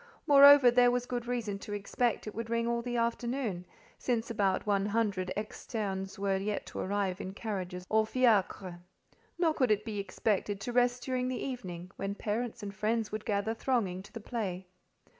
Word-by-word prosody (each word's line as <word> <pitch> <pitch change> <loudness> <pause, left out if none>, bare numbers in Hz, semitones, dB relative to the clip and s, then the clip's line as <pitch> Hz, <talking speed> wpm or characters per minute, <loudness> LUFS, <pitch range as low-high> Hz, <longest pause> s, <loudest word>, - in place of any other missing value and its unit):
Moreover, 280 -2 +9
there 245 0 +5
was 245 0 0
good 245 -1 -4
reason 225 -5 -2
to 205 - -7
expect 215 +3 -1
it 215 - -6
would 230 0 -5
ring 230 0 0
all 235 0 0
the 240 0 -3
afternoon, 235 -4 -1 0.3
since 235 -2 -1
about 200 -4 +1
one 200 -1 +1
hundred 200 -4 0
externes 200 -2 -4
were 195 -1 +1
yet 205 +2 -2
to - - -7
arrive 195 -1 -1
in 190 - -6
carriages 185 -5 -4
or 220 0 +2
fiacres: 200 -7 +1 0.6
nor 335 -2 +2
could 255 -5 +1
it 210 0 +2
be 215 -3 -3
expected 200 +1 -1
to 245 - -4
rest 245 0 +2
during 255 -1 -1
the 255 -1 -2
evening, 185 -9 -6
when 195 +1 -3
parents 215 +2 -3
and 200 -1 -5
friends 220 +2 -1
would 215 0 -4
gather 205 +1 0
thronging 225 -7 -1
to 195 - -15
the 230 - -7
play. 200 -5 -4
215 Hz, 180 wpm, -31 LUFS, 195-240 Hz, 0.6 s, Moreover